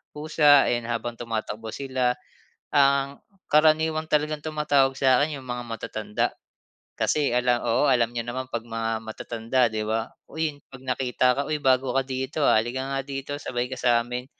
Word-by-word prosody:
pusa 150 Hz, -2 st, +5 dB
yan 120 Hz, -1 st, -1 dB
habang 120 Hz, 0 st, -3 dB
tumatakbo 110 Hz, -1 st, -4 dB
sila. 130 Hz, -2 st, 0 dB, 0.6 s
Ang 140 Hz, 0 st, +3 dB, 0.2 s
karaniwang 155 Hz, +1 st, +3 dB
talagang 150 Hz, 0 st, 0 dB
tumatawag 145 Hz, -4 st, +1 dB
sa 130 Hz, 0 st, +4 dB
akin 150 Hz, -1 st, -2 dB
yung 130 Hz, -, -12 dB
mga 120 Hz, 0 st, -4 dB
matatanda 110 Hz, -2 st, -3 dB, 0.7 s
kasi 145 Hz, -5 st, +1 dB
ala 125 Hz, 0 st, +2 dB
oo 120 Hz, +5 st, +3 dB
alam 120 Hz, -2 st, +2 dB
niyo 120 Hz, -, -1 dB
naman 125 Hz, +2 st, -5 dB
pag 115 Hz, -, -3 dB
mga 115 Hz, -1 st, -2 dB
matatanda 115 Hz, +3 st, -1 dB
di 110 Hz, 0 st, -2 dB
ba? 110 Hz, +2 st, -2 dB, 0.2 s
Uy, 155 Hz, -2 st, -3 dB
pag 135 Hz, -, -11 dB
nakita 125 Hz, -1 st, +1 dB
ka, -, -, +2 dB
"uy 155 Hz, -, 0 dB
bago 130 Hz, -2 st, +2 dB
ka 135 Hz, -, +3 dB
dito, 130 Hz, +3 st, -2 dB
ah, -, -, +5 dB
halika 120 Hz, +4 st, -3 dB
nga 135 Hz, -, -1 dB
dito 135 Hz, +1 st, -5 dB
sabay 120 Hz, -2 st, -2 dB
ka -, -, -3 dB
samin." 125 Hz, +1 st, +1 dB
130 Hz, 165 wpm, -25 LUFS, 120-145 Hz, 0.7 s, pusa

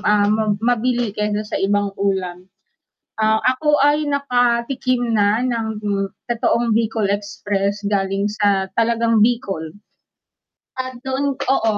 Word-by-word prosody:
ah, 210 Hz, -1 st, +3 dB, 0.3 s
mabili 240 Hz, 0 st, 0 dB
kaysa 210 Hz, 0 st, -2 dB
sa 210 Hz, -, -4 dB
ibang 200 Hz, 0 st, +1 dB
ulam. 185 Hz, -2 st, -2 dB, 0.7 s
Ah, 220 Hz, 0 st, +2 dB
ako 295 Hz, +4 st, +2 dB
ay 290 Hz, +1 st, +2 dB
nakatikim 245 Hz, -2 st, 0 dB
na 205 Hz, 0 st, +3 dB
ng 230 Hz, -3 st, -2 dB
gu 200 Hz, -2 st, -2 dB, 0.2 s
totoong 235 Hz, 0 st, +1 dB
Bicol 225 Hz, -1 st, +1 dB
Express 200 Hz, 0 st, -2 dB
galing 195 Hz, 0 st, 0 dB
sa 205 Hz, -2 st, +1 dB
talagang 230 Hz, -1 st, +2 dB
Bicol. 200 Hz, -9 st, 0 dB, 1.1 s
At 255 Hz, -1 st, -8 dB
doon 270 Hz, +1 st, -1 dB
oo. 225 Hz, -5 st, +1 dB
220 Hz, 115 wpm, -20 LUFS, 205-245 Hz, 1.1 s, ah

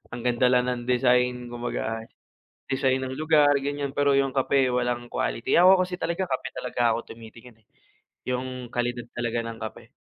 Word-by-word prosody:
"Ang 120 Hz, -, -8 dB
ganda 125 Hz, +1 st, +3 dB
lang 125 Hz, 0 st, +3 dB
ng 120 Hz, -1 st, -3 dB
design," 125 Hz, 0 st, +2 dB
kumbaga 120 Hz, -2 st, -3 dB
ay 115 Hz, -, -13 dB, 0.6 s
design 130 Hz, -1 st, +1 dB
ng 130 Hz, -, -5 dB
lugar, 150 Hz, -2 st, +4 dB
ganiyan 140 Hz, 0 st, -3 dB
pero 140 Hz, -1 st, +2 dB
yung 135 Hz, -1 st, +1 dB
kape 135 Hz, -1 st, +2 dB
walang 120 Hz, -1 st, -1 dB
quality. 115 Hz, -, -2 dB
Ako 185 Hz, 0 st, +6 dB
kasi 180 Hz, 0 st, -5 dB
talaga 170 Hz, +3 st, -1 dB
kape 130 Hz, -6 st, -3 dB
talaga 125 Hz, -1 st, -3 dB, 0.2 s
ako 115 Hz, -, -8 dB
tumitingin, 115 Hz, 0 st, -14 dB
eh, -, -, -39 dB, 0.6 s
yung 125 Hz, 0 st, -3 dB
kalidad 120 Hz, 0 st, -2 dB
talaga 120 Hz, -1 st, -1 dB
ng 115 Hz, 0 st, -5 dB
kape. 110 Hz, -, -7 dB
125 Hz, 175 wpm, -25 LUFS, 120-135 Hz, 0.6 s, Ako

